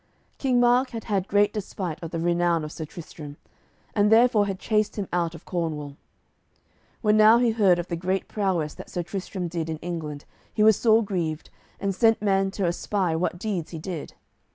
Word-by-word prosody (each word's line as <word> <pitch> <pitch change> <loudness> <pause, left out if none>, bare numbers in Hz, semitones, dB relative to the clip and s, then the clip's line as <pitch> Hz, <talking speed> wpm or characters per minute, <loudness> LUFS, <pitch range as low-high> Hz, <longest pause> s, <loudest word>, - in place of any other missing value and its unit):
King 255 -3 +2
Mark 245 +2 +4
had 225 -1 -6
had 195 -3 -1
great 205 +1 +3
despite 190 -5 -5
of 165 - -5
the 165 - -4
renown 170 -1 +1
of 150 - -6
Sir 160 - -6
Tristram, 150 -2 -10 0.6
and 210 0 +3
therefore 225 -2 +5
had 195 -1 -3
chased 215 +1 0
him 200 -3 -3
out 170 -1 0
of 165 - -13
Cornwall. 155 -5 -3 1.1
When 210 -1 +4
now 215 +2 +7
he 240 -1 +3
heard 200 -5 +4
of 175 - -3
the 170 - -3
great 185 +3 -2
prowess 185 -7 -1
that - - -11
Sir 175 - -3
Tristram 185 0 -5
did 165 -1 -4
in 160 - -3
England 155 -4 -6 0.3
he 210 - +1
was 220 -1 +7
sore 225 +1 +4
grieved, 170 -6 -3 0.3
and 200 -1 -1
sent 225 +3 +3
men 195 -2 +1
to 195 0 -2
espy 175 0 -1
what 175 +1 -1
deeds 185 -4 -3
he 165 - -7
did. 160 -1 -6
185 Hz, 195 wpm, -25 LUFS, 165-210 Hz, 1.1 s, now